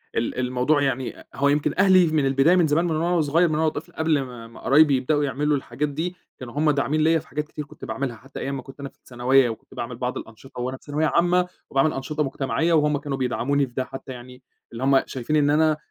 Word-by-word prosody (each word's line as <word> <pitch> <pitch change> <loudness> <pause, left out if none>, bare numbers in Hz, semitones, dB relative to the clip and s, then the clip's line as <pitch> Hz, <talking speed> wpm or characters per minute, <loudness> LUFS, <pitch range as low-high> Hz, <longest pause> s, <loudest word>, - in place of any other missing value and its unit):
ال 115 +2 -1
الموضوع 130 +4 +1
يعني 130 -2 -2
هو 140 +1 +2
يمكن 145 0 +1
أهلي 185 -3 +6
من 155 -3 +1
البداية 135 +6 +4
من 175 -3 +4
زمان 155 +4 +2
من 165 -2 0
وأنا 170 +3 0
وصغيّر، 165 +2 +3
من 155 - -1
وأنا 160 +1 +2
طفل 155 +1 -8
قبل 160 -2 +1
ما 120 -3 -8
ما 115 - -14
قرايبي 145 +1 +5
يبدؤوا 145 +3 0
يعملوا 145 +1 0
الحاجات 135 +3 -3
دي 165 +5 -3 0.2
كانوا 120 -2 -8
هُم 150 +1 +2
داعمين 145 +2 0
ليَّ 160 +1 +3
في 160 - -15
حاجات 150 0 -4
كتير 150 -1 -7
كنت - - -11
باعملها، 135 -3 -3
حتى 135 +4 -11
أيام 140 0 -3
ما - - -6
كنت 135 +1 -14
أنا 140 0 -6
في - - -31
الثانوية 125 +1 +2
وكنت 110 - -9
باعمل 120 +1 -5
بعض 125 +1 -3
الأنشطة 120 +3 -9
وأنا 130 +2 -3
في - - -27
ثانوية 150 +2 0
عامة 175 +2 +2 0.2
وباعمل 135 +3 +2
أنشطة 150 +3 -2
مُجتمعية 145 +4 -1
وهُم 150 -2 +3
كانوا 140 -1 -4
بيدعموني 135 +2 0
في 120 - -18
ده، 130 - -1
حتى 135 0 -9
يعني 125 0 -11 0.3
اللي 120 +2 -6
هم 135 0 +4
شايفين 130 +4 -3
إن 145 -1 +3
أنا 155 +1 +3
140 Hz, 240 wpm, -23 LUFS, 130-155 Hz, 0.3 s, أهلي